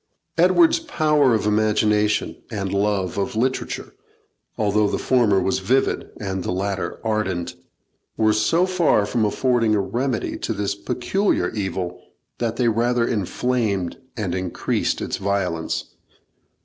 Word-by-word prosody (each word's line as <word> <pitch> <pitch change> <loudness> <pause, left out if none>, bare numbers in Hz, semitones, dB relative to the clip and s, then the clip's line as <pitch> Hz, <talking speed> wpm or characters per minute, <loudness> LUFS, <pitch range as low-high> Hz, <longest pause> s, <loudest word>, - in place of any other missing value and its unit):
Edward's 335 -1 +5
power 150 - +2
of 110 - -1
imagination 105 0 +2
and 100 -4 -3
love 100 -2 0
of 100 - -2
literature, 130 +4 -2 0.6
although 105 0 +2
the - - -1
former 115 -7 +3
was 95 +1 0
vivid 125 +8 0
and 95 -3 -3
the - - -2
latter 95 +1 -2
ardent, 105 -6 -1 0.6
were 110 -1 +3
so 110 +12 +2
far 175 - +2
from 110 +1 0
affording 115 0 +2
a - - +2
remedy 120 +5 -2
to - - -2
this 100 -1 -1
peculiar 120 - 0
evil, 95 -4 -3 0.4
that 115 -1 -1
they 120 0 +1
rather 120 +1 +2
inflamed 105 -3 -1 0.2
and 100 -5 -2
increased 90 -2 -1
its - - -3
violence. 95 -4 -2
105 Hz, 130 wpm, -22 LUFS, 100-120 Hz, 0.6 s, Edward's